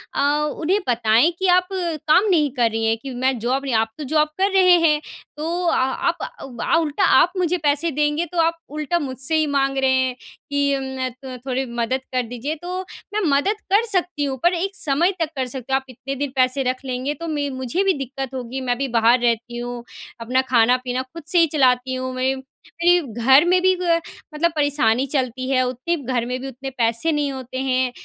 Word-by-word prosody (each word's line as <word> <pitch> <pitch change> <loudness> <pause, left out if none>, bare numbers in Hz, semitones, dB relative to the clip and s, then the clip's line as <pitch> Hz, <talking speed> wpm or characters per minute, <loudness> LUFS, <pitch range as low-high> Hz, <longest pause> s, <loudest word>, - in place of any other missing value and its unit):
अ, - - -1 0.4
उन्हें 370 +6 +2
बताएँ 235 +5 +3
कि 380 - +1
आप 360 0 +4
काम 340 0 +2
नहीं 305 -6 +3
कर 240 -3 +3
रही 225 0 -1
हैं 225 0 +2
कि 275 - -6
मैं 255 +1 0
जॉब 255 +4 -1
नहीं 265 - -2
आप 225 0 +2
तो 305 - -5
जॉब 305 +2 +2
कर 390 +1 +2
रहे 365 -2 +6
हैं 300 -1 +3 0.4
तो 340 +3 -2
आ - - +2 0.3
आप 340 - -2 0.3
उ 255 -3 -10
अ, - - +2
उल्टा 310 -3 0
आप 355 +5 +4
मुझे 360 0 +1
पैसे 295 +3 +2
देंगे 295 +3 0
तो 350 - -2
आप 330 +1 +1
उल्टा 305 +4 -1
मुझसे 265 +2 -3
ही 310 - +2
माँग 275 -1 0
रहे 265 -1 +2
हैं 260 -1 +1 0.4
कि 285 0 +2
उम, 265 0 -5
अ - - -1 0.3
अ, - - -8
थोड़ी 265 +1 -1
मदद 240 +2 -2
कर 255 -1 +1
दीजिए 245 +6 -4
तो 365 +1 -4 0.3
मैं 425 - 0 0.2
मदद 410 +8 -1
कर 445 +3 +5
सकती 355 -5 0
हूँ 270 -1 -3
पर 345 +1 +4
एक 385 +3 -2
समय 320 +5 +1
तक 325 -2 0
कर 260 -1 -2
सकती 260 +1 -6
हूँ। - - +5
आप 265 - -27
इतने 265 +2 -6
दिन 280 0 -3
पैसे 255 +1 +2
रख 255 +1 -11
लेंगे 255 +3 -2
तो 335 +3 -7
मैं 290 -3 -2
मुझे 325 +10 0
भी 390 -1 +3
दिक्कत 270 0 -6
होगी 255 +1 -5
मैं 245 -1 -1
भी 275 +1 -1
बाहर 235 +3 +5
रहती 240 0 0
हूँ। 240 0 -5 0.4
अपना 250 +3 +1
खाना-पीना 250 +2 +3
खुद 335 -2 -9
से 355 - +4
ही 330 - +5
चलाती 260 -2 +2
हूँ 255 0 -4
मेरे 260 +1 0 0.5
मेरे 350 +1 +6 0.2
घर 270 +5 +7
में 360 +1 +3
भी 375 0 +4
ग 335 -2 +2 0.3
मतलब 335 +3 +1
परेशानी 285 -5 +2
चलती 255 -2 -2
है 255 -1 +3
उतने 255 +7 -2 0.2
घर 235 -2 0
में 250 +1 -3
भी 270 - -5
उतने 270 +1 -7
पैसे 230 +7 +1
नहीं 295 -2 0
होते 260 -1 -7
हैं 255 -1 +1
270 Hz, 220 wpm, -21 LUFS, 255-330 Hz, 0.5 s, घर